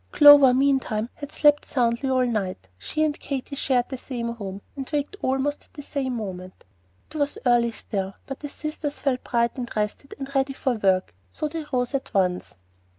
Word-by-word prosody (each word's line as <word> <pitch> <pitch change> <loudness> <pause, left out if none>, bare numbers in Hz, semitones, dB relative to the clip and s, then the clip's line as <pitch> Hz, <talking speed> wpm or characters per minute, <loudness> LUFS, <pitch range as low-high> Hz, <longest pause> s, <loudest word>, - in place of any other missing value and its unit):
Clover, 290 -4 +9
meantime, 255 -4 +1
had 285 0 -8
slept 295 -1 +4
soundly 240 +1 0
all 255 -1 +3
night. 200 - -2
She 310 - -1
and 305 -1 0
Katy 280 0 -4
shared 255 -3 +1
the 265 - -5
same 235 -3 -4
room, 200 -3 -7
and 270 -2 -6
waked 295 +5 -1
almost 270 +2 -1
at - - -34
the 290 - -8
same 265 -3 -2
moment. 185 -4 -7 0.5
It 310 - -6
was 285 -1 0
early 240 -1 +4
still; 195 -3 -4
but 270 - -6
the 290 - -6
sisters 305 0 -5
felt 260 -3 0
bright 235 -1 +1
and 240 -1 -4
rested 210 +6 -3
and 275 0 -7
ready 270 0 +1
for 265 -1 0
work, 190 - +1 0.2
so 305 - -3
they 315 0 -5
rose 250 0 0
at 265 -4 -3
once. 180 -2 0
260 Hz, 190 wpm, -25 LUFS, 230-285 Hz, 0.5 s, Clover